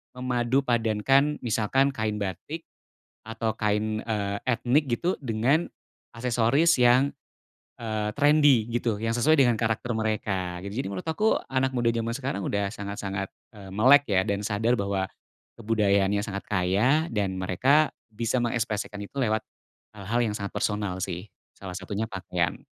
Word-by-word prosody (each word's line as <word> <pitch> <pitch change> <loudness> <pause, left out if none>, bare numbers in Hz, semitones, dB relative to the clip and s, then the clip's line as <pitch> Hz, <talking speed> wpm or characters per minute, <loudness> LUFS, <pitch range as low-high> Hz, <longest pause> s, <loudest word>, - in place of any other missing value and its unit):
memadu 125 +1 0
padankan 120 +5 +2
misalkan 120 +4 +2
kain 110 -4 -2
batik 105 - -5 0.7
atau 115 0 -2
kain, 110 0 -1
eee, 100 -3 -2
etnik 125 +4 +2
gitu 170 +10 -1
dengan 130 +7 +1 0.5
aksesoris 125 +6 +2
yang, 125 +3 +5 0.7
eee, 110 -2 -2
trendi 145 -6 +5
gitu, 115 -2 -1
yang 115 +1 -1
sesuai 145 +5 +3
dengan 120 -3 +5
karakter 115 +1 -1
mereka. 100 -5 -2
Jadi 100 +8 -4
menurut 95 +7 -6
aku 210 +8 +2
anak 130 0 0
muda 120 -2 0
jaman 115 0 0
sekarang, 125 -6 -3
udah 100 -1 -1
sangat-sangat, 100 -1 -5 0.2
eee, 100 -2 -11
melek 130 +8 +6
ya 95 -1 +2
dan 100 0 -1
sadar 110 +4 +1
bahwa 100 -2 -1 0.5
kebudayaannya 100 -2 +1
sangat 100 -1 -4
kaya 105 - +2
dan 100 - -2
mereka 130 - +3 0.2
bisa 115 +3 -1
mengekspresikan 110 -3 -2
itu 100 +6 -9
lewat 110 -2 +1 0.6
hal-hal 105 +4 -2
yang 110 -3 0
sangat 100 -1 -4
personal 105 -3 -2
sih, 95 +2 -5 0.2
salah 95 -2 -8
satunya 100 +3 -4
pakaian. 90 -3 -2
110 Hz, 140 wpm, -26 LUFS, 100-125 Hz, 0.7 s, melek